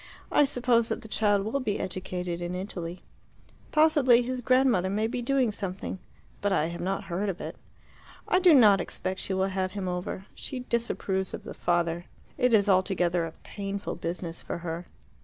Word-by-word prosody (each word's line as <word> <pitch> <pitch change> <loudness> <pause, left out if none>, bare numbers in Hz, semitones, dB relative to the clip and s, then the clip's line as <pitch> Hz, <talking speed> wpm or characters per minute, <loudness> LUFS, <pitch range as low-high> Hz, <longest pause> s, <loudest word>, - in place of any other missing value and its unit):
I 295 - +5
suppose 245 -4 +2
that - - -3
the - - -9
child 205 -2 +2
will 230 +6 -1
be 215 -6 -1
educated 180 -1 -4
in 175 +1 -3
Italy. 180 -2 -5 0.7
Possibly 290 -6 +5
his 255 +1 -3
grandmother 255 -7 +3
may 210 +3 0
be 245 +2 -2
doing 260 -2 +2
something, 195 -2 -4 0.4
but 205 - +1
I 165 -4 +2
have 170 - -6
not 195 +2 -1
heard 190 +4 -2
of 185 - -4
it. - - -6 0.7
I 365 - +4
do 355 -4 +7
not 210 -7 +7
expect 185 +2 -4
that - - -2
she 190 - -1
will 190 +1 +1
have 185 -1 -2
him 200 -2 -3
over. 180 +1 -4
She 260 -3 -6
disapproves 215 -6 -1
of - - -10
the - - -7
father. 175 0 0 0.3
It 250 - +2
is 210 -3 +5
altogether 180 -3 +2
a 160 - -9
painful 200 0 -4
business 170 0 -4
for - - -4
her." 170 0 -5
195 Hz, 185 wpm, -28 LUFS, 180-235 Hz, 0.7 s, do